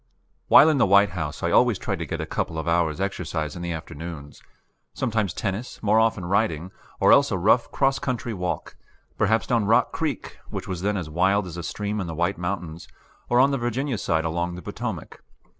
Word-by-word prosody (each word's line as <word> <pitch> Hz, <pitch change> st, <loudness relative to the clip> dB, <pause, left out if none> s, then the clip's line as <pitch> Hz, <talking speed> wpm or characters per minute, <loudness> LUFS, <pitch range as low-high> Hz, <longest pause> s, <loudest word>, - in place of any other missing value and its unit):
While 150 Hz, -, +8 dB
in 150 Hz, -3 st, +2 dB
the -, -, +4 dB
White 100 Hz, +1 st, +5 dB
House 75 Hz, -2 st, -5 dB
I -, -, +1 dB
always -, -, +4 dB
tried -, -, -3 dB
to -, -, -4 dB
get -, -, -4 dB
a -, -, -2 dB
couple 80 Hz, -, -3 dB
of 80 Hz, -, -4 dB
hours' 85 Hz, -1 st, +1 dB
exercise 80 Hz, -6 st, -3 dB
in 90 Hz, -, -7 dB
the 85 Hz, 0 st, -3 dB
afternoons 80 Hz, -2 st, -8 dB, 0.5 s
sometimes 110 Hz, -4 st, 0 dB
tennis, 100 Hz, +8 st, -4 dB
more 110 Hz, +1 st, +4 dB
often 110 Hz, -5 st, +1 dB
riding, 95 Hz, -3 st, 0 dB, 0.3 s
or -, -, +5 dB
else 140 Hz, 0 st, +6 dB
a 95 Hz, -, -1 dB
rough 110 Hz, +6 st, +3 dB
cross 135 Hz, 0 st, +1 dB
country 120 Hz, -3 st, -3 dB
walk, 90 Hz, -3 st, -4 dB, 0.4 s
perhaps 110 Hz, +2 st, +2 dB
down 115 Hz, -4 st, +1 dB
Rock 115 Hz, +4 st, +3 dB
Creek, 155 Hz, -6 st, -4 dB
which -, -, -6 dB
was 90 Hz, -2 st, -4 dB
then 105 Hz, +1 st, 0 dB
as 85 Hz, -4 st, -4 dB
wild 95 Hz, +5 st, +2 dB
as 85 Hz, -3 st, -8 dB
a 85 Hz, -, -5 dB
stream 105 Hz, +4 st, -3 dB
in 90 Hz, -, -4 dB
the 80 Hz, -, -5 dB
White 85 Hz, +4 st, -1 dB
Mountains, 90 Hz, -2 st, -4 dB, 0.4 s
or 120 Hz, -, +4 dB
on 135 Hz, +2 st, +5 dB
the 135 Hz, -, -1 dB
Virginia 120 Hz, +1 st, -2 dB
side 80 Hz, -2 st, 0 dB
along 85 Hz, +2 st, -2 dB
the 90 Hz, -, -9 dB
Potomac. -, -, -6 dB
95 Hz, 210 wpm, -24 LUFS, 85-110 Hz, 0.5 s, While